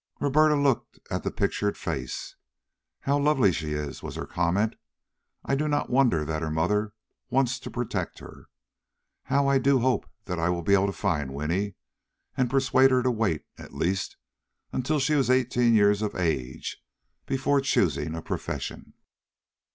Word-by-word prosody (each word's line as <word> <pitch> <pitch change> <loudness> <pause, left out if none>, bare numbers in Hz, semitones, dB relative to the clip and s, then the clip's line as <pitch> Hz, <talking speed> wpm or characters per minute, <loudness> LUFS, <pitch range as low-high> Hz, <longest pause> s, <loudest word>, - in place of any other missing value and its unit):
Roberta 150 +2 +4
looked 140 -3 0
at - - -1
the - - -2
pictured 105 0 -1
face. - - -4 0.7
"How 140 +1 +1
lovely 140 -8 +4
she 80 -2 -3
is!" 75 -1 -4
was - - -7
her - - -4
comment. 95 +6 0 0.7
"I - - -1
do 150 +3 +1
not 145 -3 0
wonder 120 - +3
that 80 0 -2
her 80 - -2
mother 100 +7 0 0.4
wants 130 0 +1
to - - -8
protect 120 -1 -3
her. - - -13 0.8
How 140 0 +2
I 140 -1 +4
do 140 +1 +4
hope 130 0 +1 0.2
that 90 -3 -3
I 80 +2 +1
will 85 -1 -1
be 100 - +2
able 100 0 +4
to - - -1
find 75 -10 -2
Winnie 90 +7 -1 0.6
and 125 -2 +1
persuade 135 0 +4
her 130 -1 +2
to 130 - +2
wait, 105 -10 -1
at - - -11
least, 95 +3 -1 0.6
until 140 +5 0
she 135 +3 +1
is 140 -4 +2
eighteen 125 -2 +3
years 105 -1 +4
of 105 - -2
age 70 -8 -2 0.4
before 135 +1 +1
choosing 80 - +1
a 80 - -6
profession." - - -5
110 Hz, 165 wpm, -27 LUFS, 85-135 Hz, 0.8 s, Roberta